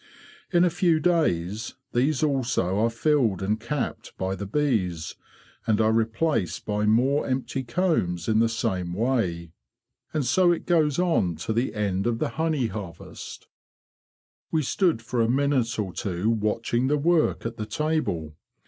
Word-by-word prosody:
In 175 -1 +4
a 180 - +3
few 170 -2 +2
days 110 - 0 0.2
these 135 +4 +1
also 120 -10 +1
are 115 +2 +3
filled 115 - +1
and 105 +3 0
capped 150 +3 -4
by 95 0 -1
the 100 +1 -5
bees, 100 - 0 0.5
and 110 -2 +2
are 110 0 +4
replaced 115 - 0
by 105 0 0
more 130 +7 +3
empty 130 0 -2
combs 120 - 0
in 110 0 +3
the 115 0 +3
same 95 -6 -2
way; 95 -8 -1 0.6
and 150 -4 -1
so 175 +8 +4
it 170 - -2
goes 155 -5 +2
on 165 - +1
to 85 +8 -3
the 120 +2 -1
end 100 -1 0
of 120 -1 0
the - - -1
honey 155 +1 0
harvest." 100 -7 -7 1.0
We 155 -1 +1
stood 160 - +1
for 120 0 -1
a 115 - +2
minute 130 -3 +1
or 100 -5 -2
two 100 +1 -1
watching 115 +3 0
the 150 +2 +2
work 160 -2 +2
at 115 0 -4
the 105 - -4
table. 150 - -1
115 Hz, 155 wpm, -25 LUFS, 105-150 Hz, 1.0 s, In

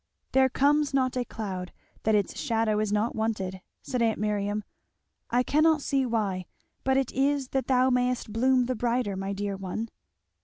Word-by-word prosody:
"There 265 0 +4
comes 285 +2 +2
not 255 -1 +1
a 250 - 0
cloud 190 -6 -5 0.3
that 220 0 +4
its 205 -3 0
shadow 225 -2 0
is 215 -1 0
not 210 +3 0
wanted," 195 -4 -2 0.2
said 250 -3 -2
aunt 225 -1 +2
Miriam. 210 0 -1 0.7
"I 245 +1 +2
cannot 310 +2 +3
see 270 -2 +1
why, 200 -6 -1 0.4
but 265 0 +2
it 270 -2 0
is 275 0 +1
that 265 -1 -1
thou 255 0 +3
mayest 250 -3 0
bloom 255 +2 +3
the 255 - -1
brighter, 240 -3 0
my 195 +1 -3
dear 200 0 -2
one." 195 +4 -4
230 Hz, 170 wpm, -27 LUFS, 210-260 Hz, 0.7 s, There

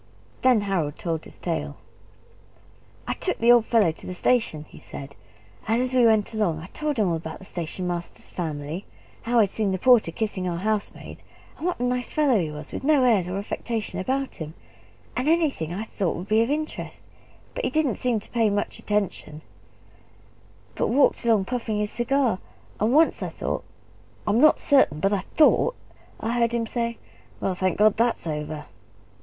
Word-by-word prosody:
Then 250 -4 +4
Harold 175 -8 -1
told 165 -5 -3
his - - -13
tale. 155 -4 -3 1.3
"I - - 0
took 370 - -2
the 235 +1 +5
old 240 -2 +6
fellow 220 -8 +4
to 160 - -10
the 185 - -5
station," 200 -8 +1
he - - -14
said, 140 0 -9 0.5
"and 225 +2 +2
as 255 0 +1
we 245 -2 +5
went 220 0 +2
along 205 -7 0
I 160 - -8
told 300 -3 -2
him 210 -3 +2
all 170 - +1
about 160 0 -6
the 190 - -11
station 175 +1 -4
master's 175 -1 -4
family, 155 +1 -4 0.4
and 230 - -5
how - - +5
I 225 - +7
had 200 - -1
seen 210 -3 0
the 190 - 0
porter 235 -4 +5
kissing 190 -1 -2
our 170 - -2
housemaid, 210 +2 -3 0.3
and 340 - -4
what 360 - -1
a - - -1
nice 250 0 -1
fellow 285 -8 +3
he 165 -4 -1
was, 150 0 -8
with - - -5
no 290 -2 +4
airs, 215 -8 +3
or 180 +2 -3
affectation 215 +2 -3
about 265 +7 -2
him, 160 0 -7 0.6
and 255 +3 -1
anything 305 - +1
I 195 +5 -3
thought 195 -5 -2
would 180 - -6
be 215 +2 +4
of 230 - +1
interest; 305 +2 -4 0.5
but - - -4
he - - +1
didn't 305 -8 +1
seem 245 -3 0
to - - -17
pay 230 -3 +2
much 205 0 -2
attention, 190 -7 -2 1.3
but - - 0
walked 270 +2 +3
along 220 -5 +3
puffing 230 -3 -2
his 210 0 -1
cigar, 240 -4 +1 0.4
and 215 +3 +2
once 315 +4 +4
I - - -2
thought - - -3 0.6
I'm 215 +4 +2
not 310 - +6
certain, 265 - +3
but 195 +5 +2
I 195 -2 -1
THOUGHT 400 +10 +4 0.4
I 225 - -2
heard 235 -1 +1
him 230 -1 0
say, 235 0 -2 0.4
'Well, 190 - 0
thank 185 0 0
God, 215 0 +4
that's 235 -5 +1
over!' 150 -1 -4
215 Hz, 195 wpm, -25 LUFS, 175-245 Hz, 1.3 s, I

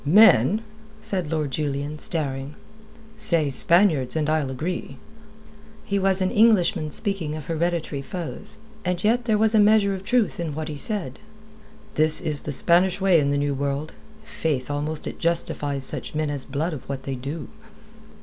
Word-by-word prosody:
"Men?" 195 - +5 0.4
said 190 -7 -4
Lord 155 -3 -2
Julian, 145 +1 -3
staring. 140 -4 -2 0.6
"Say 155 -5 +5
Spaniards, 160 -2 +3
and 155 -1 0
I'll 155 -4 0
agree." 140 +1 -5 0.9
He 200 0 -1
was 195 0 +1
an 185 - 0
Englishman 190 -8 +3
speaking 175 -3 -3
of 155 -3 -8
hereditary 165 -3 -2
foes. 170 +3 -5 0.3
And 180 0 -2
yet 235 +3 +1
there 220 -3 +2
was 220 +1 +2
a 220 - +4
measure 205 -1 +4
of 190 0 -6
truth 225 -3 0
in 160 -4 -4
what 155 0 -5
he 150 - -5
said. 175 - -2 0.7
"This 155 0 +5
is 150 -2 -1
the 150 - -5
Spanish 180 +6 +2
way 190 -3 +4
in 140 -1 0
the 145 - 0
New 145 0 -1
World. 140 +3 -3 0.3
Faith, 145 -10 -3
almost 150 +2 -3
it - - -7
justifies 145 -4 -1
such - - 0
men 155 -1 -1
as 140 -2 -3
Blood 150 +5 -3
of 145 - -6
what 135 -1 -5
they 135 - -4
do." 140 +5 -6
155 Hz, 170 wpm, -23 LUFS, 145-185 Hz, 0.9 s, Men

